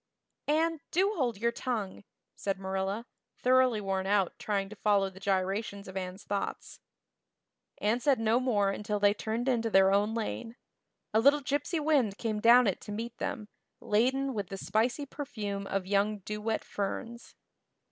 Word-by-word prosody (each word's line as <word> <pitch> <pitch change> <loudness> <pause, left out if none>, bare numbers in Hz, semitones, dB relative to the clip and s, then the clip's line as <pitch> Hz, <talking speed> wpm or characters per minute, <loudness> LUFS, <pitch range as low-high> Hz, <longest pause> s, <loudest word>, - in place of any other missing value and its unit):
"Anne, 320 +2 +2
do 390 +4 +2
hold 245 - 0
your 235 +3 +1
tongue," 220 -6 -3 0.3
said 195 -1 -2
Marilla, 195 +3 -2 0.3
thoroughly 255 -3 +4
worn 195 -1 -2
out 200 -2 +2
trying 200 -2 -1
to 215 - -10
follow 200 -2 +2
the 190 - -13
gyrations 200 +1 -1
of 190 - -9
Anne's 185 +1 -5
thoughts. 200 -1 -4 1.0
Anne 215 +4 +1
said 265 0 +2
no 225 +2 +3
more 210 -6 +2
until 210 +1 -2
they 205 0 +5
turned 225 +4 -3
into 230 -3 +1
their 195 -2 +5
own 205 +3 +2
lane. 230 +1 -4 0.6
A 220 - +5
little 285 +5 +5
gypsy 290 +5 -1
wind 280 -10 +2
came 215 -2 -2
down 240 +3 +7
it 195 -4 0
to - - -8
meet 230 +3 -5
them, 215 - -3 0.3
laden 260 +5 +1
with 205 -4 -3
the 195 - -6
spicy 240 +8 0
perfume 210 -9 -5
of 195 -1 -2
young 205 +2 +1
dew 210 +2 -6
wet 220 +1 -1
ferns. 230 +4 -5
215 Hz, 165 wpm, -30 LUFS, 200-245 Hz, 1.0 s, down